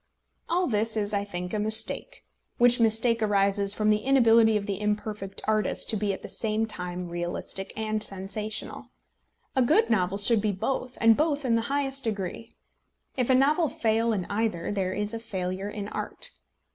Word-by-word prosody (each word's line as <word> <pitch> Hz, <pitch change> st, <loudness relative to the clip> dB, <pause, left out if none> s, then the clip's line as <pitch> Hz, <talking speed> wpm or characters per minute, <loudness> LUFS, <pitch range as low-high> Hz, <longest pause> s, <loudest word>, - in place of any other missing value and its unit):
All 360 Hz, +2 st, +1 dB
this 220 Hz, -2 st, +1 dB
is, 205 Hz, 0 st, -1 dB
I 200 Hz, 0 st, 0 dB
think, 180 Hz, -3 st, -5 dB
a 215 Hz, -, -1 dB
mistake, 220 Hz, -, +1 dB, 0.3 s
which 245 Hz, 0 st, +5 dB
mistake 225 Hz, +1 st, +3 dB
arises 200 Hz, -1 st, +3 dB
from 215 Hz, 0 st, +1 dB
the 210 Hz, -, +2 dB
inability 230 Hz, -4 st, +4 dB
of 200 Hz, -, -4 dB
the 200 Hz, -1 st, -4 dB
imperfect 210 Hz, -2 st, -3 dB
artist 215 Hz, -1 st, +2 dB
to -, -, -1 dB
be 205 Hz, -1 st, -1 dB
at 190 Hz, -, -6 dB
the -, -, -6 dB
same 220 Hz, 0 st, -1 dB
time 180 Hz, -4 st, -5 dB
realistic 175 Hz, +2 st, -4 dB
and 215 Hz, -1 st, -2 dB
sensational. 200 Hz, +2 st, -4 dB, 0.7 s
A 260 Hz, -, +3 dB
good 315 Hz, -, +3 dB
novel 190 Hz, -2 st, +1 dB
should 210 Hz, +2 st, +3 dB
be 210 Hz, 0 st, 0 dB
both, 255 Hz, +5 st, -3 dB
and 225 Hz, 0 st, +5 dB
both 295 Hz, -1 st, 0 dB
in 240 Hz, -, +1 dB
the 230 Hz, -, +2 dB
highest 275 Hz, -1 st, -1 dB
degree. 210 Hz, 0 st, -4 dB, 0.6 s
If 250 Hz, -2 st, -1 dB
a 260 Hz, -, +5 dB
novel 295 Hz, +5 st, +3 dB
fail 225 Hz, 0 st, 0 dB
in 195 Hz, -5 st, -2 dB
either, 205 Hz, -5 st, -2 dB
there 190 Hz, -2 st, -1 dB
is 210 Hz, +2 st, -2 dB
a 230 Hz, -, -4 dB
failure 190 Hz, -3 st, -4 dB
in 205 Hz, -1 st, -6 dB
art. -, -, -2 dB
215 Hz, 180 wpm, -26 LUFS, 200-230 Hz, 0.7 s, which